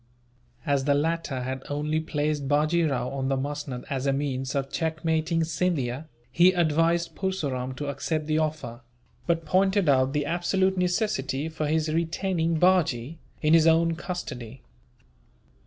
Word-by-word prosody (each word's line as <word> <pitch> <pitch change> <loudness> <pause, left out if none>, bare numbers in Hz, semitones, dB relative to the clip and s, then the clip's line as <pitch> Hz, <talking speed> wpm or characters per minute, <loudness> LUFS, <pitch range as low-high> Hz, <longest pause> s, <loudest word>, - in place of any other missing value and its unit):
As 140 -3 +1
the 145 -1 +3
latter 155 -3 -1
had 130 +1 -4
only 150 +2 -1
placed 150 -2 -2
Bajee 155 +3 +2
Rao 125 -2 -1
on 135 -1 -3
the 135 - +1
musnud 140 -2 -4
as 135 0 -2
a - - +3
means 135 -1 -2
of 135 -1 -2
checkmating 160 0 0
Scindia, 155 -5 -1 0.2
he 175 +6 +5
advised 170 0 +1
Purseram 140 -10 -3
to 145 - -5
accept 150 +3 -2
the 155 +1 +1
offer; 150 -6 -3 0.5
but 165 -1 0
pointed 190 +2 +2
out 135 -1 +3
the 145 -1 0
absolute 190 +4 +1
necessity 180 - -1
for 155 -1 -3
his 155 +1 +1
retaining 165 0 0
Bajee 165 -6 +2 0.2
in 155 +1 +4
his 165 -1 +6
own 165 0 +4
custody. 135 - -6
155 Hz, 145 wpm, -26 LUFS, 135-170 Hz, 0.5 s, his